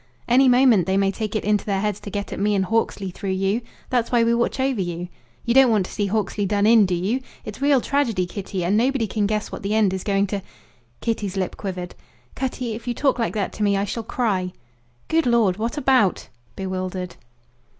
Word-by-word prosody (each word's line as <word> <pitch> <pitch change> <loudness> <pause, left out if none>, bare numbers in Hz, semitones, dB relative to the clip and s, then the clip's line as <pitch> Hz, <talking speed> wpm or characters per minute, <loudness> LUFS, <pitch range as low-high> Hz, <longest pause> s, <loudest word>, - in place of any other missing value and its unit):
Any 255 +2 +5
moment 245 -8 +5
they 190 0 +2
may 195 0 +2
take 215 +1 -4
it 215 - 0
into 210 -1 +1
their 195 -2 -1
heads 210 0 -1
to - - -8
get 200 0 -4
at - - -5
me 205 +1 +2
and 190 -1 +1
Hawksley 200 -2 -1
through 190 +1 -3
you. 195 +5 0 0.3
That's 245 -1 +1
why 240 -2 +4
we 230 0 +3
watch 235 +3 0
over 260 -5 +1
you. 175 0 -4 0.4
You 235 - +2
don't 265 -1 +7
want 210 -5 +2
to - - -10
see 205 -2 -1
Hawksley 205 0 -1
done 205 +1 +1
in, 220 -2 +6
do 180 - 0
you? 205 +9 -1 0.2
It's 210 +4 -8
real 280 -1 +4
tragedy, 235 -11 0
Kitty, 185 -1 -4
and 190 +4 +2
nobody 250 +1 +2
can 210 -1 -1
guess 215 0 -2
what - - -6
the 200 +2 -1
end 210 -4 +3
is 190 - -3
going 200 -1 +1
to 200 0 -3
be." 195 - -17 0.6
Kitty's 205 -4 -2
lip 185 -1 -2
quivered. 180 -3 -5 0.4
"Cutty, 250 -3 -3
if 230 +2 -8
you 240 - -1
talk 270 -2 +1
like 230 - -1
that 205 -2 -2
to - - -8
me 200 -1 +3
I 195 - 0
shall 230 +3 -3
cry." 200 -6 -1 0.5
"Good 325 -3 +2
Lord, 225 -6 +3
what 230 +6 -3
about?" 260 -9 +2 0.3
bewildered. 185 -1 -4
210 Hz, 225 wpm, -22 LUFS, 195-235 Hz, 0.6 s, don't